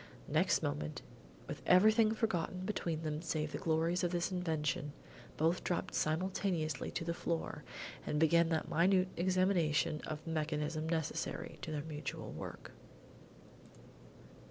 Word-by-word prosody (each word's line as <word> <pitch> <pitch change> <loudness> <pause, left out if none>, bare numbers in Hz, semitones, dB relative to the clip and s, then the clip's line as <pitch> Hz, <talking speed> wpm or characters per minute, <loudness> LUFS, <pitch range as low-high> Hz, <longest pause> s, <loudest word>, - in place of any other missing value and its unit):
Next - - +2
moment, 75 +1 -2 0.4
with - - -6
everything 215 +4 +6
forgotten 185 -5 -1
between 170 -5 -2
them 155 0 -2
save 155 -2 -2
the - - -4
glories 165 +3 +1
of 175 - +2
this 175 +1 -1
invention, 155 -5 -1 0.4
both 165 +3 +2
dropped 180 +1 -1
simultaneously 160 -2 0
to 165 - -3
the 170 - 0
floor 170 -1 -3 0.4
and 150 - -1
began 165 +2 +5
that 160 -2 0
minute 185 +2 +3
examination 175 -4 +2
of 155 -1 -4
the 165 - -5
mechanism 155 0 -1
necessary 160 -2 -2
to 160 - -5
their 150 -2 -2
mutual 150 -2 -5
work. - - -7
165 Hz, 130 wpm, -35 LUFS, 155-180 Hz, 0.4 s, everything